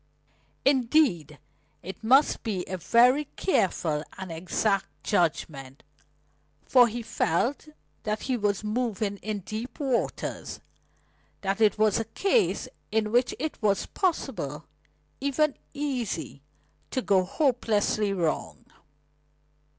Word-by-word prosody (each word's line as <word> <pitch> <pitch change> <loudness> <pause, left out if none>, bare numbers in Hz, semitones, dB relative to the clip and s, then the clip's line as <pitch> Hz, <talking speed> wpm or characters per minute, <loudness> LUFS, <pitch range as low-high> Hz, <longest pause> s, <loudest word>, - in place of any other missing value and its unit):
Indeed, 250 - +3 0.5
it 190 +5 -8
must 265 +6 +4
be 195 -6 -2
a 185 - -4
very 250 - +4
careful 165 - +1
and 190 -2 -6
exact 190 +4 0 0.2
judgment, 150 -7 -1 0.8
for 250 -2 +6
he 235 +1 -5
felt 230 - 0 0.3
that 215 0 -2
he 260 - 0
was 205 -3 0
moving 215 -2 -1
in 210 0 -4
deep 225 - -6
waters; 265 -5 -2 0.8
that 195 +2 -1
it 215 -1 +4
was 215 -1 +3
a 225 - -2
case 395 - +1 0.2
in 215 -1 +1
which 245 +2 +2
it 310 0 -4
was 200 -3 +2
possible, 185 - -2 0.5
even 280 +2 +1 0.2
easy, 245 - -3 0.5
to 260 - -2
go 190 -2 +3
hopelessly 215 - +1
wrong. 170 -5 -2
215 Hz, 110 wpm, -27 LUFS, 190-255 Hz, 0.8 s, for